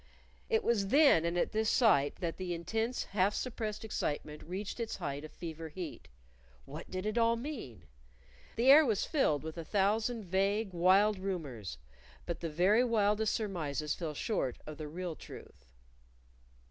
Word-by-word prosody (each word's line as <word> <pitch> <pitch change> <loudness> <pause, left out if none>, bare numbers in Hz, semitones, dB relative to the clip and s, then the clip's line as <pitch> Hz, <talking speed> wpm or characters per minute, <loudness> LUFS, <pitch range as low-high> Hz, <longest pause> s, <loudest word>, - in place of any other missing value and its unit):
It 450 -1 +2
was 210 -4 +1
then 275 - +5
and 170 +1 0
at - - +1
this 220 0 +1
sight 145 - +4
that 170 -2 -2
the 180 -2 -3
intense 225 +8 -2
half 200 +1 +1
suppressed 220 -4 -4
excitement 150 -7 -3
reached 190 +7 -5
its 230 -1 -3
height 140 +1 -4
of 155 - -9
fever 165 -1 -7
heat. 165 0 -7 0.6
What - - -9
did 185 +1 -4
it 215 +2 0
all 230 0 +4
mean? 230 - -7 0.7
The 245 +4 +5
air 305 +3 +9
was 225 -8 +1
filled 155 - +1
with 160 +1 -6
a - - -4
thousand 215 +6 +1
vague, 195 +3 0
wild 190 +4 +4
rumors 145 - -4 0.5
but 170 - -4
the 165 - -3
very 185 +9 +4
wildest 215 -2 +2
surmises 155 - -2
fell 160 -4 -5
short 140 - -1
of 155 0 -8
the 155 - -5
real 175 +2 -5
truth. 60 - -12
190 Hz, 160 wpm, -32 LUFS, 160-220 Hz, 0.7 s, air